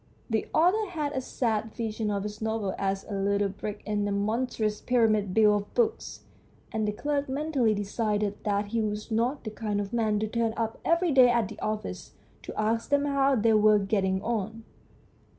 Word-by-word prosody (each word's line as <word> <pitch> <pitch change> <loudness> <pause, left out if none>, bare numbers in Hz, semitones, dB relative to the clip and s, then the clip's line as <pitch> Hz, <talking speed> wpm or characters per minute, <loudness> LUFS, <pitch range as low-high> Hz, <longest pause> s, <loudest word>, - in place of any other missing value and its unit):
The 220 - 0
author 370 +6 +3
had 305 -5 -2
a 260 - -1
sad 220 -4 -2
vision 220 -2 -2
of 200 -1 -1
his 210 +1 -6
novel 220 -3 -1
as 195 0 -1
a 210 - -6
little 200 +1 +1
brick 205 +1 -6
in 205 -1 -1
a - - -1
monstrous 215 +1 -1
pyramid 215 -5 +2
built 210 0 +4
of - - -27
books, 455 -2 0 0.5
and 220 -1 -1
the - - +1
clerk 285 +5 -2
mentally 270 -5 +1
decided 205 0 -1
that 205 -1 0
he 230 +1 0
was 210 +1 -3
not 240 +6 0
the 215 - -5
kind 210 -1 -2
of 205 +2 -4
man 220 -3 +1
to 215 +1 -1
turn 230 0 -1
up 225 -1 -2
every 335 0 +2
day 260 -3 +7
at 235 -5 +1
the - - -10
office 215 0 -4 0.3
to - - -7
ask 225 +2 0
them 285 0 +2
how 275 -1 +2
they 225 -1 +3
were 215 0 +5
getting 195 -1 0
on. 225 -1 -3
220 Hz, 190 wpm, -28 LUFS, 205-245 Hz, 0.5 s, day